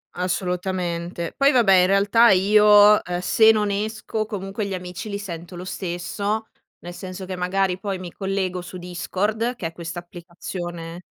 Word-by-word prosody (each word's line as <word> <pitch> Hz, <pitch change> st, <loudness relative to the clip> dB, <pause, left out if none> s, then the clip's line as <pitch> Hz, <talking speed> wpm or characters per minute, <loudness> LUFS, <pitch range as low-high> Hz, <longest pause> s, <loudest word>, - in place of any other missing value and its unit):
Assolutamente. 180 Hz, -2 st, -2 dB
Poi 275 Hz, +1 st, +4 dB
vabbè 230 Hz, -8 st, +4 dB
in 180 Hz, 0 st, +5 dB
realtà 205 Hz, +4 st, +5 dB
io, 210 Hz, +2 st, +6 dB
ehm, 175 Hz, 0 st, -3 dB
se 220 Hz, +4 st, +5 dB
non 210 Hz, -2 st, 0 dB
esco, 215 Hz, +1 st, -3 dB
comunque 200 Hz, 0 st, -4 dB
gli 195 Hz, -, -3 dB
amici 180 Hz, +2 st, -7 dB
li 200 Hz, -, -3 dB
sento 175 Hz, -3 st, -8 dB
lo 175 Hz, -, -7 dB
stesso, 195 Hz, +4 st, -3 dB, 0.3 s
nel 175 Hz, 0 st, -9 dB
senso 185 Hz, +1 st, -7 dB
che 185 Hz, 0 st, -5 dB
magari 185 Hz, +1 st, 0 dB
poi 195 Hz, -1 st, -3 dB
mi 180 Hz, -2 st, -8 dB
collego 190 Hz, -2 st, -2 dB
su 180 Hz, +1 st, -9 dB
Discord, 205 Hz, +7 st, -2 dB
che 185 Hz, -, -7 dB
è 165 Hz, -, -2 dB
questa 170 Hz, +1 st, -7 dB
applicazione 175 Hz, 0 st, -8 dB
185 Hz, 160 wpm, -23 LUFS, 175-205 Hz, 0.3 s, io